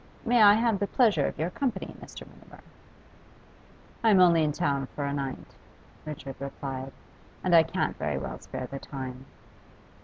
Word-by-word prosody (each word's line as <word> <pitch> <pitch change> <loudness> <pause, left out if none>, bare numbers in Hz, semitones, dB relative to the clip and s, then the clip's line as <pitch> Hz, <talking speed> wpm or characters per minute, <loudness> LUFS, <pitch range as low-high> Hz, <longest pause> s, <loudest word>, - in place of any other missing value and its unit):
May 240 -1 +4
I 205 -1 +8
have 225 -2 +1
the 200 - 0
pleasure 225 -1 +3
of - - -5
your 160 +3 -2
company, 235 -4 -3
Mr. - - -10
Mutimer?' - - -17 1.4
'I'm 215 -4 +5
only 170 -3 +6
in 150 - +1
town 140 -4 -1
for 145 - -2
a 140 - -2
night,' 135 -2 -5 0.5
Richard 140 -3 -7
replied; 135 -1 -6 0.5
'and 180 - +1
I 165 - +9
can't 160 - -2
very - - -1
well - - -5
spare 130 - -6
the 135 +2 -7
time. 130 -1 -7
155 Hz, 160 wpm, -28 LUFS, 135-200 Hz, 1.4 s, I